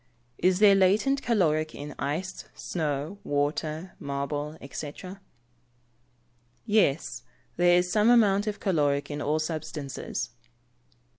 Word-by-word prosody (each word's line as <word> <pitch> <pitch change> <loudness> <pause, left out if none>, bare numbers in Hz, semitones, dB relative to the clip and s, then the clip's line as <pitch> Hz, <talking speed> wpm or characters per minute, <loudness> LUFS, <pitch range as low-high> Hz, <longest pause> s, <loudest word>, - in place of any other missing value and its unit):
Is 185 0 +3
there 205 0 +7
latent 210 +9 +3
caloric 160 -9 +1
in 145 +1 -7
ice, 175 +7 -3
snow, 155 +2 -3
water, 155 +4 -2
marble, 145 +2 -3
&c? 145 -1 -5 1.7
Yes; 205 -9 +1 0.3
there 175 0 +5
is 180 0 +1
some 215 +3 +4
amount 210 -4 +4
of 210 -1 -3
caloric 145 -7 +1
in 145 0 -4
all 150 +2 +1
substances. 155 -6 -4
160 Hz, 105 wpm, -27 LUFS, 145-195 Hz, 1.7 s, there